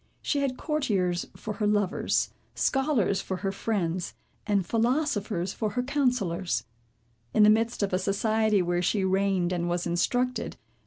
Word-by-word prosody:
She 290 - 0
had 270 -2 -1
courtiers 200 - 0
for 215 - -5
her 210 - +1
lovers, 205 -2 +1 0.2
scholars 265 -8 +1
for 190 - -4
her 195 - +1
friends, 185 -4 -2 0.3
and 200 -3 +2
philosophers 225 - 0
for 215 - -2
her 245 - 0
counsellors. 245 - 0 0.7
In 215 - +6
the 210 - +8
midst 225 0 +1
of 195 - -1
a 185 - +2
society, 210 +1 +2
where 175 0 0
she 190 +2 +1
reigned 190 -2 +1
and 175 -1 -1
was 175 0 -1
instructed. 245 +9 0
205 Hz, 150 wpm, -27 LUFS, 185-235 Hz, 0.7 s, the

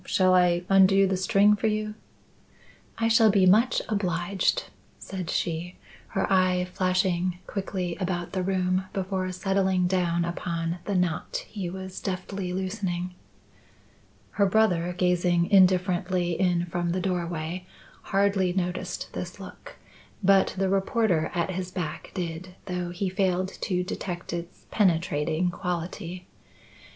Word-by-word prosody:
Shall 185 -1 +3
I 180 -1 +4
undo 195 0 +6
the 190 0 +1
string 200 +2 +4
for 215 +2 -1
you?" 215 0 -1 1.0
"I 225 - +1
shall 225 -1 +5
be 195 -2 +4
much 220 +7 +4
obliged," 185 -2 0 0.3
said 185 -4 -6
she, 170 +1 -2 0.3
her 190 - -1
eye 185 -1 +3
flashing 185 -1 +1
quickly 185 -3 -3
about 175 -2 -2
the 190 - 0
room 185 0 0
before 190 -1 -2
settling 190 0 +1
down 175 -2 +1
upon 170 0 -3
the 200 - -1
knot 180 -3 -1
he 195 -5 -5
was 190 +1 -7
deftly 190 -1 -4
loosening. 185 -1 -3 1.2
Her 200 -1 +2
brother, 185 -4 +2
gazing 180 0 +2
indifferently 185 -2 +3
in 175 0 +1
from 175 0 -2
the 185 - -1
doorway, 175 -1 -3 0.4
hardly 195 -2 +2
noticed 180 -1 -3
this - - -6
look; - - -11 0.5
but 195 0 +4
the 195 0 +1
reporter 195 -3 +1
at 170 +1 0
his 185 0 -4
back 180 -5 -5
did, 180 0 -5
though 180 -2 -3
he 180 +3 -2
failed 185 0 0
to 180 -2 -2
detect 180 -2 -5
its 170 0 -7
penetrating 165 -3 +1
quality. 175 0 -4
185 Hz, 130 wpm, -26 LUFS, 175-195 Hz, 1.2 s, undo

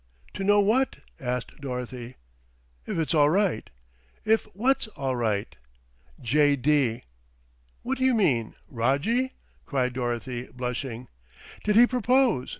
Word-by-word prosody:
"To 195 - -4
know 205 +1 +4
what?" 225 +7 +2 0.2
asked 125 +1 -4
Dorothy. 125 -2 -6 0.7
"If - - -3
it's 165 +1 0
all 150 -2 +5
right." 185 - +1 0.6
"If 220 +1 +3
what's 250 +4 +1
all 135 -11 -3
right?" 110 -3 -1 0.6
"J. 145 +4 +3
D." 135 -4 +1 0.8
"What 260 +1 -2
do 260 - +2
you 260 -2 +4
mean, 135 - +1
Rojjie?" 145 - 0 0.3
cried 125 -3 0
Dorothy, 120 0 -3
blushing. 125 0 -4 0.6
"Did 210 0 +1
he 235 +2 +8
propose? 250 - +2
140 Hz, 125 wpm, -26 LUFS, -, 0.8 s, he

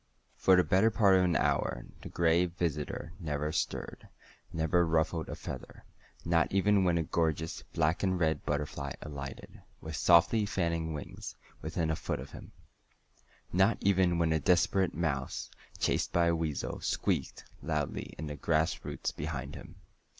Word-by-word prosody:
For 95 - +5
the 90 - +5
better 95 +5 +4
part 100 -3 +4
of 95 - +4
an 85 -2 +1
hour - - 0 0.2
the - - -8
Gray 85 +1 +3
Visitor 85 -2 -3
never 75 -2 -2
stirred, 80 - -3 0.4
never 80 +2 +2
ruffled 80 0 0
a - - -4
feather - - -8 0.4
not 85 0 +2
even 100 0 +3
when 85 -2 +3
a 80 - +1
gorgeous 80 0 -1
black 80 +1 +2
and 95 -2 +1
red 80 -3 +1
butterfly 70 -1 -3
alighted, 70 -2 -8 0.2
with 80 0 -6
softly 90 +7 +4
fanning 85 -4 -1
wings, 75 - -7 0.3
within 80 +1 -1
a - - 0
foot - - -3
of - - -9
him; - - -11 1.0
not 95 +5 +4
even 95 -3 +3
when 80 -1 +2
a 80 - +2
desperate 90 -1 +2
mouse, 75 -5 -2 0.3
chased - - 0
by 85 0 +3
a 85 0 +3
weasel, 80 -4 -3
squeaked - - -1 0.2
loudly 75 -3 -3
in 80 - -5
the 75 -1 -5
grass 80 +3 0
roots - - -3
behind 70 -2 -5
him. - - -10
80 Hz, 155 wpm, -31 LUFS, 75-90 Hz, 1.0 s, For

